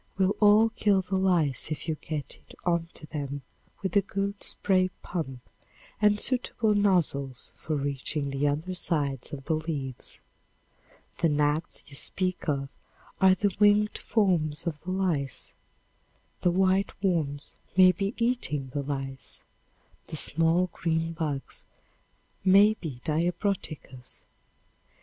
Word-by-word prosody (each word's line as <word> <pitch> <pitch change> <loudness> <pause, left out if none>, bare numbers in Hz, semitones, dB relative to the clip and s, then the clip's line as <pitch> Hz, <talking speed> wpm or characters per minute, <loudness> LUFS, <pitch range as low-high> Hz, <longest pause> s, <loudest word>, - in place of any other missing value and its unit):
will 195 +1 +2
all 215 +2 +6
kill 205 -3 +2
the 190 +1 -3
lice 175 -10 +1
if 155 - -4
you 160 - +1
get 155 -1 -5
it - - -17
onto 170 -2 -1
them 145 -2 -5 0.4
with 190 - -2
a 200 - +6
good 200 +1 -3
spray 185 -2 +2
pump 140 -8 -4 0.6
and 210 0 +4
suitable 240 -3 +1
nozzles 165 - 0
for 155 - -3
reaching 140 0 -2
the 135 +2 +1
under 155 +6 -1
sides 145 -7 -1
of 135 -2 -6
the 160 - 0
leaves. 150 -5 -4 1.0
The 165 - +3
gnats 150 +2 0
you 145 - -15
speak 185 +4 -3
of 140 -1 -1 0.5
are 190 0 +7
the 200 0 0
winged 210 0 +4
forms 170 -9 +1
of 155 -4 -3
the 180 - -8
lice; 175 -8 -1 0.9
the 180 - +2
white 190 +2 +2
worms 150 -7 -1 0.2
may 185 -1 +8
be 195 +4 -3
eating 230 - 0
the 145 - -1
lice; 135 -1 -5 0.6
the - - -6
"small 165 +4 +3
green 165 0 -1
bugs" 150 -4 -3 0.8
may 200 +3 +7
be 160 - -7
diabroticas. 165 - -2
165 Hz, 130 wpm, -28 LUFS, 145-190 Hz, 1.0 s, may